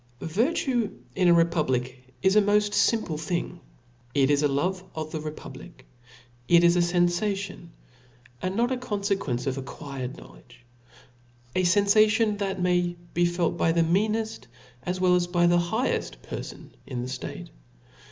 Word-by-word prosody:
TTlRrUE 235 - 0 0.2
in 185 -1 +3
a 175 - +7
republic, 130 -6 0
is 190 +1 +4
a 210 - +7
moft 205 0 +2
fimple 210 -8 +1
^ - - -7
thing; 175 +2 -3 0.6
it 140 0 +3
is 145 0 +3
a 150 - +3
love 180 +7 -1
of 155 -1 -5
the 155 - -4
republic; 155 +1 -9 0.6
it 170 +3 +6
is 170 0 +5
a - - +3
fenfation, 175 +2 0 0.7
and 185 +1 -2
not 240 +3 +1
a 260 - 0
confequence 200 - -2
of 135 0 -2
acquired 135 -1 -7
know - - -13
ledge: 125 - -19 0.9
a - - +3
fenfation, 210 +3 +3
that 195 -2 -2
may 180 -1 +1 0.2
be 175 +1 +2
felt 175 -1 -1
by 165 - +2
the 165 0 +3
meaneft 210 - 0 0.3
as 180 +7 -3
well 185 -1 +4
as 180 -1 +2
by 175 -1 +2
the 175 0 +4
highcft 220 +9 -1
perlon - - -8 0.2
in 125 -2 -4
the - - -5
ftate. 130 0 -6
175 Hz, 160 wpm, -26 LUFS, 155-200 Hz, 0.9 s, a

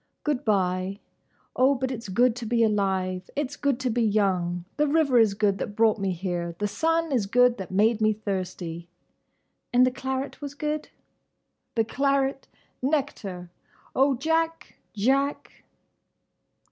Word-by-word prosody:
"Good 295 -4 -1
bye. 190 -1 0 0.6
Oh, 265 +2 +4
but 260 0 -2
it's 230 -4 -6
good 240 +5 +3
to 235 -2 -5
be 230 0 +2
alive! 190 -3 0
It's 290 -1 -2
good 280 -4 0
to 255 -2 0
be 240 +2 0
young! 185 -5 +1
The 300 0 +3
river 285 -4 +3
is 215 -3 +4
good 200 -2 +1
that 205 - -4
brought 220 -1 +3
me 195 -1 0
here! 175 -1 -3
The 205 - -1
sun 325 +7 0
is 235 -7 +1
good 245 +2 +4
that 190 - -6
made 215 +4 +2
me 215 0 +4
thirsty!" 185 -5 -4 0.8
"And 250 +1 +5
the 255 - +1
claret 265 +2 -4
was 285 -1 -6
good?" 300 +1 -3 0.9
"The 225 - +3
claret—! 275 +2 0 0.3
Nectar!—Oh, 260 - -2
Jack!—Jack! 285 -4 -1
230 Hz, 140 wpm, -26 LUFS, 195-275 Hz, 0.9 s, And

